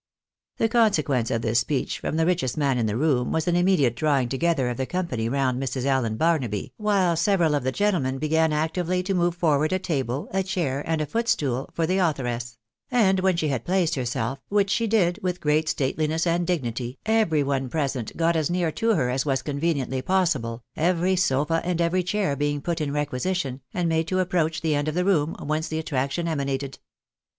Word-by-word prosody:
The 225 - +2
consequence 155 - +2
of 115 - -1
this 115 +1 +2
speech 130 +3 -2
from - - -3
the 165 - +2
richest 170 -8 0
man 140 -4 +1
in 115 - +1
the 105 +1 -1
room 135 -4 +1
was 160 +1 -1
an 175 - +2
immediate 175 -9 +3
drawing 140 -5 +1
together 135 -1 +1
of 120 - -4
the 130 - -2
company 130 -12 -2
round 130 -1 0
Mrs. 130 -1 -2
Allan 130 -5 +1
Barnaby, 130 - 0
while 200 -5 +2
several 170 -2 +2
of 145 - +1
the 130 - 0
gentlemen 165 -9 0
began 160 +2 +2
actively 170 +4 0
to 195 +1 -1
move 175 -1 +1
forward 155 -2 +2
a 185 - +2
table, 140 -7 -2
a 190 - +2
chair, 175 -8 -2
and 160 -1 0
a - - 0
footstool, 145 - -1
for 165 - +1
the 185 +4 +1
authoress; 120 -8 -1 0.3
and 195 -6 +3
when 185 -2 +2
she 155 -3 0
had 135 -4 -2
placed 180 -2 +1
herself, 125 0 -2
which 200 -1 +2
she 230 +3 +1
did 200 -4 +2
with 180 -2 -2
great 155 +1 +1
stateU 150 +2 0
ness 160 +2 0
and 170 0 +1
dignity, 125 -7 -2
every 215 -9 +2
one 135 -2 -1
present 135 -6 -3
got 165 0 +2
as 155 -3 +1
near 175 -2 0
to 225 +5 +1
her 125 -7 +1
as 130 +1 0
was 135 -3 -1
conveniently 140 -3 -1
possible, 140 -11 0
every 180 +3 +1
sofa 165 -2 +1
and 175 -1 -1
every 170 +2 +2
chair 190 -4 -1
being 145 +1 -1
put 170 +3 -3
in 145 -2 -1
requisition, 145 0 -2
and 175 -2 -1
made 160 0 0
to 185 - -1
approach 170 -4 0
the 160 -2 +1
end 145 +1 0
of 155 - -2
the 180 0 +1
room, 165 -6 +2
whence 155 +2 -1
the 160 - -3
attraction 150 +2 -2
emanated. 140 -3 -3
155 Hz, 205 wpm, -25 LUFS, 135-180 Hz, 0.3 s, immediate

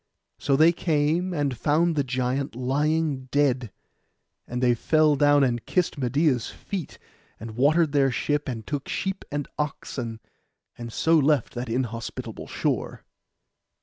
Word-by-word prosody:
So 140 - +2
they 160 +4 +6
came, 165 +2 0
and 145 -6 -1
found 160 +7 +2
the 145 - +2
giant 130 +1 -2
lying 145 +2 0
dead; 130 -4 +1 0.8
and 125 - -3
they 125 -1 +3
fell 155 +5 +3
down, 145 0 +4
and 120 -3 0
kissed 180 -2 0
Medeia's 130 -1 +1
feet; 190 -7 -6 0.4
and 115 +1 -7
watered 145 +7 +3
their 140 -2 +3
ship, 145 +4 -1
and 115 -3 -5
took 145 -2 -4
sheep 195 0 -2
and 145 -1 -3
oxen, 125 -5 -4 0.6
and 120 -1 -7
so 160 +7 +3
left 145 -3 +2
that 120 0 -5
inhospitable 115 -1 -4
shore. - - -2
140 Hz, 140 wpm, -25 LUFS, 125-155 Hz, 0.8 s, they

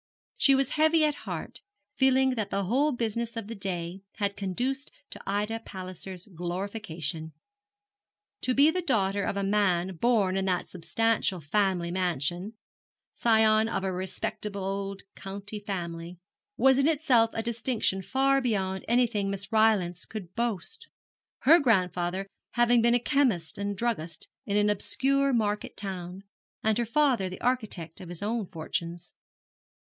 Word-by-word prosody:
She 275 - +6
was 270 0 +1
heavy 315 +1 +4
at 300 - +2
heart, - - -7 0.3
feeling 265 0 +4
that 220 -5 -2
the 200 - -1
whole 265 +10 +2
business 230 -1 -2
of 225 - -3
the 225 - -6
day 185 -3 -4
had 200 -1 -1
conduced 250 +9 -2 0.2
to - - -8
Ida 210 +3 -1
Palliser's 185 -2 -8
glorification. 175 -3 -4 1.1
To 255 - 0
be 290 +3 +6
the 365 +2 -1
daughter 200 - +1
of 200 - -1
a 200 - 0
man 190 -3 +1
born 200 -3 +2
in 190 - 0
that 180 -2 0
substantial 185 +3 0
family 175 +2 0
mansion 175 +2 -1 0.6
scion 220 -1 +4
of 195 - -2
a 190 - 0
respectable 190 +2 -4
old 195 0 -3
county 200 +2 -6
family 175 -3 -5 0.4
was 265 0 +5
in 275 - +4
itself 275 -8 +4
a 225 - -1
distinction 230 -4 0
far 270 +6 +2
beyond 190 -6 -1
anything 235 -4 +2
Miss 200 +2 -4
Rylance 210 -6 +3
could 190 -5 -8
boast, 240 - -3 0.5
her 325 +6 +7
grandfather 185 - +1 0.3
having 240 0 +4
been 235 +1 +4
a - - +4
chemist 235 - +1
and 200 0 -2
druggist 175 -9 -2 0.2
in 205 0 +1
an 210 0 +4
obscure 275 +7 +1
market 210 -4 -1
town, 185 -1 -5 0.4
and 220 +1 +2
her 235 - 0
father 245 -6 +2
the 185 - -8
architect 215 -11 -2
of 180 - -9
his 175 +2 -7
own 220 -1 -1
fortunes. 170 0 -5
205 Hz, 145 wpm, -28 LUFS, 185-240 Hz, 1.1 s, her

